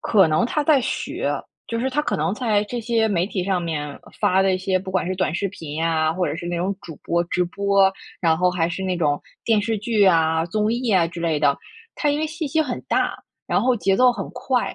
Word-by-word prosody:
可 195 -7 +4
能 155 +10 +2
他 300 - 0
在 290 -2 +4
学， - - -3 0.4
就 230 - -3
是 260 +2 0
他 280 +3 +1
可 295 - -1
能 160 +5 0
在 215 -3 +1
这 240 +3 -4
些 225 -1 +1
媒 180 -3 +1
体 195 -2 -3
上 190 -1 0
面 150 -4 -4 0.2
发 185 +1 +3
的 190 -1 +2
一 - - -1
些， 185 0 0
不 190 0 -7
管 185 - +1
是 185 - -2
短 185 -3 0
视 200 +3 -1
频 160 -6 -8
呀， 160 0 +1
或 180 +2 -1
者 145 - -3
是 170 - -6
那 175 - -2
种 180 +3 0
主 160 - -9
播 170 0 0
直 180 +1 0
播， 195 +1 +2 0.3
然 160 -2 +2
后 180 +1 +3
还 175 -2 0
是 175 +2 -5
那 185 -1 -1
种 145 -4 +1 0.2
电 225 -2 +3
视 225 +2 -1
剧 210 0 +2
啊、 160 -3 +3
综 215 +4 0
艺 245 +1 -2
啊 170 -3 +3
之 170 - -9
类 165 -3 0
的。 140 -2 +3 0.4
它 295 - +1
因 290 +1 0
为 - - +1
信 315 0 -4
息 315 +3 +1
很 255 -5 -4
大， - - 0 0.3
然 - - +2
后 255 0 +3
节 195 -3 +1
奏 250 +2 +6
很 245 - -5
快， 250 0 -1
190 Hz, 270 characters per minute, -22 LUFS, 170-230 Hz, 0.4 s, 奏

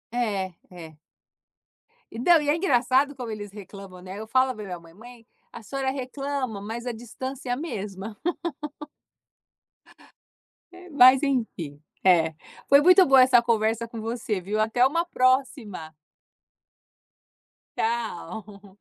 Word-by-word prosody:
É, 200 -6 -1 0.2
é. 165 -4 -11 1.2
E 225 - -7
não, 330 +4 +5
e 290 - -2
é 300 - +4
engraçado 275 -3 +2
como 245 -3 -6
eles 205 -2 -7
reclamam, 195 -2 -11
né? 190 +2 -8
Eu 220 - -7
falo 260 +2 +2
para 215 -2 -8
a - - -8
minha 180 -2 -6
mãe, 165 0 -17
mãe, 230 +3 -14 0.3
a 230 - -10
senhora 265 +4 -2
reclama 265 -4 -4
mas 230 +4 -6
a 245 - -2
distância 255 +3 -7
é - - +1
a - - -2
mesma. 210 - -6 2.5
É, 360 0 -14
mas 265 -2 +7
enfim 220 - -2 0.2
é 165 -4 +4 0.3
foi 280 +1 +7
muito 365 +3 +7
boa 270 -2 +6
essa 255 -2 +6
conversa 230 0 0
com 230 0 -8
você 225 -4 -3
viu 210 +4 -3
até 225 +3 +3
uma 335 +5 +1
próxima. 255 - 0 1.8
Tchau. 210 -2 -4
230 Hz, 135 wpm, -25 LUFS, 200-260 Hz, 2.5 s, mas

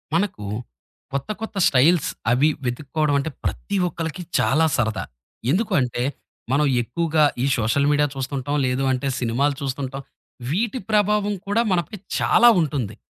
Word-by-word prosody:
మనకు 175 - -1 0.7
కొత్త, 140 +5 -3
కొత్త 220 -2 -6
స్టైల్స్ 150 +5 +4 0.2
అవి 135 +5 +4 0.2
వెతుక్కోవడం 145 +4 -1
అంటే 150 - -2 0.2
ప్రతి 205 - -3
ఒక్కళ్లకి 165 +1 -5 0.2
చాలా 155 +5 +3
సరదా. 110 -5 0 0.5
ఎందుకంటే, 135 - +1 0.5
మనం 145 +3 +3 0.2
ఎక్కువగా 155 +6 +1 0.2
ఈ - - +2
సోషల్ 115 +5 +1
మీడియా 145 0 +3
చూస్తుంటాం 135 +1 -3
లేదు 130 +1 0
అంటే 130 +1 -1
సినిమాలు 130 +4 +1
చూస్తుంటాం, 135 0 -4 0.5
వీటి 225 - -1
ప్రభావం 210 0 +2
కూడా 205 +3 +2
మనపై 175 +3 -1 0.2
చాలా 240 +1 +6
ఉంటుంది. 135 -9 -2
145 Hz, 130 wpm, -22 LUFS, 130-175 Hz, 0.7 s, చాలా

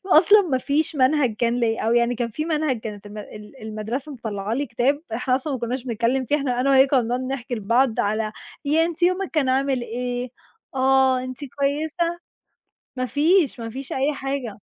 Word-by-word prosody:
أصلًا 395 +4 +7
ما 275 -8 0
فيش 295 +3 0
منهج 260 -4 +3
كان 235 +1 +1
ليَّ، 225 -1 +1
أو 225 +1 +1
يعني 240 +1 +3
كان 235 0 -2
في 305 +8 -3
منهج، 305 -7 0
كانت 210 -2 -7
الم 210 +1 -9
ال 210 +4 -11
المدرسة 220 +7 -4
مطلّعة 215 -4 -4
لي 285 +3 -1
كتاب، 275 +5 0
إحنا 250 +2 0
أصلًا 275 +3 -2
ما 260 - -2
كناش 245 +2 -3
بنتكلم 240 +2 0
فيه، 290 +5 +1
إحنا 255 -4 -1
أنا 275 +2 +2
وهي 265 0 +6
كنا 270 -1 +3
بنقعد 245 +3 -1
نحكي 260 -1 -4
لبعض 230 +3 +2
على 215 +1 -1 0.3
ياه 315 +3 +3
أنتِ 340 0 -5
يومِك 365 +2 +2
كان 300 -5 +1
عامل 265 -1 +1
إيه؟ 245 +1 -3 0.4
آه، 265 0 +4
أنتِ 255 -1 -7
كويسة؟ 305 +5 -1 0.8
ما 255 0 -1
فيش، 300 -1 +2
ما 230 0 -5
فيش 270 +3 -7
أي 275 +3 +1
حاجة. 270 -6 -4
260 Hz, 190 wpm, -23 LUFS, 235-285 Hz, 0.8 s, أصلًا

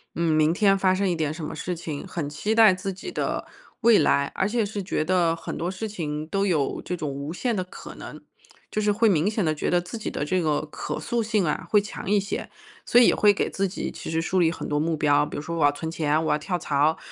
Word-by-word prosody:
嗯， 170 -1 +1
明 155 +1 +3
天 195 +1 +3
发 190 -1 +3
生 195 0 +1
一 175 - 0
点 155 -2 -1
什 160 0 -7
么 150 - -4
事 180 - -3
情， 160 -2 -6
很 170 -6 -4
期 205 +9 -2
待 220 -4 +7
自 190 +2 -4
己 195 - -8
的 - - -2 0.4
未 230 -2 +6
来， 140 0 +2
而 190 - +1
且 225 0 0
是 205 0 -4
觉 180 -4 -1
得 175 -2 +2
很 - - -6
多 170 - -2
事 190 +4 -4
情， 155 -6 -4
都 195 +4 0
有 155 -8 0
这 180 - -3
种 155 -4 -4
无 140 +3 -5
限 235 +5 -1
的 185 - -1
可 180 - -11
能。 - - -9 0.5
就 215 - -1
是 210 - +2
会 225 +3 +3
明 180 -2 +3
显 210 -3 -1
地 155 -1 +1
觉 150 - -2
得 175 - +3
自 180 +7 -7
己 220 - -4
的 - - -3
这 185 +4 +1
个 155 -3 +1
可 150 - -5
塑 235 +9 -1
性 215 -4 +1
啊， 150 - -2
会 210 - +5
强 200 -1 -6
一 210 - +4
些。 200 0 -4 0.4
所 240 - +5
以 245 - +7
也 - - +4
会 210 -1 +5
给 - - -1
自 195 0 -1
己 190 - -4
其 - - -8
实 160 0 0
树 185 +3 0
立 165 -2 +4
很 - - -6
多 145 - 0
目 160 +1 0
标， 145 -1 +3
比 - - -7
如 - - -3
说 170 +2 -5
我 160 - +1
要 145 - +5
存 160 +3 -5
钱， 155 -1 0
我 - - +1
要 150 - +3
跳 180 +4 -2
槽， 150 0 +1
175 Hz, 295 characters per minute, -25 LUFS, 155-200 Hz, 0.5 s, 待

